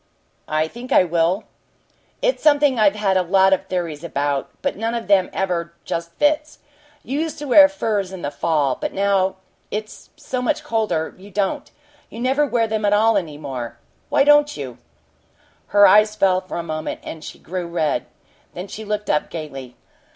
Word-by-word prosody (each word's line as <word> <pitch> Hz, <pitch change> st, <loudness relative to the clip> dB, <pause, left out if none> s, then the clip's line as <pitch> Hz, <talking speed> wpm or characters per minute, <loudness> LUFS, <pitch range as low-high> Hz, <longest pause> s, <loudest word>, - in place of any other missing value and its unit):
"I 155 Hz, +1 st, 0 dB
think 240 Hz, +8 st, -10 dB
I -, -, +6 dB
will." 170 Hz, +3 st, +1 dB, 0.8 s
"It's -, -, +1 dB
something 290 Hz, -4 st, +4 dB
I've 210 Hz, -1 st, +4 dB
had 200 Hz, -3 st, +1 dB
a -, -, +3 dB
lot 190 Hz, +2 st, +4 dB
of 190 Hz, 0 st, -1 dB
theories 170 Hz, -5 st, -3 dB
about, 145 Hz, -4 st, -2 dB
but -, -, 0 dB
none 225 Hz, +3 st, -2 dB
of 235 Hz, -, -4 dB
them 195 Hz, -2 st, +4 dB
ever 170 Hz, -3 st, -2 dB
just 170 Hz, 0 st, -4 dB
fits. 300 Hz, -, +1 dB, 0.5 s
You 275 Hz, +3 st, -3 dB
used 320 Hz, 0 st, -3 dB
to 295 Hz, -, -6 dB
wear 290 Hz, +3 st, +8 dB
furs 210 Hz, -9 st, -2 dB
in 190 Hz, -2 st, -8 dB
the 145 Hz, -, -2 dB
fall, 145 Hz, -3 st, +1 dB
but -, -, -4 dB
now 195 Hz, -1 st, +1 dB, 0.3 s
it's 215 Hz, +1 st, -6 dB
so 255 Hz, -1 st, -4 dB
much 250 Hz, -, -1 dB
colder, 215 Hz, -8 st, -1 dB
you 200 Hz, +2 st, -13 dB
don't 205 Hz, +9 st, -2 dB, 0.4 s
you 225 Hz, -, -9 dB
never 270 Hz, +4 st, +2 dB
wear 240 Hz, -3 st, +1 dB
them 220 Hz, -1 st, -2 dB
at 205 Hz, 0 st, +3 dB
all 220 Hz, +2 st, +4 dB
any 165 Hz, -7 st, -2 dB
more. 125 Hz, -5 st, -6 dB, 0.3 s
Why -, -, +4 dB
don't 295 Hz, 0 st, +4 dB
you?" 130 Hz, -4 st, -7 dB, 0.9 s
Her 205 Hz, 0 st, +6 dB
eyes 215 Hz, +1 st, +5 dB
fell 185 Hz, -3 st, +2 dB
for 185 Hz, -, -7 dB
a 170 Hz, -, -3 dB
moment, 155 Hz, -1 st, -4 dB
and 160 Hz, -, -8 dB
she -, -, -9 dB
grew 180 Hz, +1 st, -5 dB
red. 165 Hz, -4 st, -1 dB, 0.5 s
Then 180 Hz, +3 st, -6 dB
she 220 Hz, -, -8 dB
looked 210 Hz, 0 st, -3 dB
up 150 Hz, -, 0 dB
gaily. 135 Hz, -6 st, -7 dB
195 Hz, 185 wpm, -21 LUFS, 165-225 Hz, 0.9 s, wear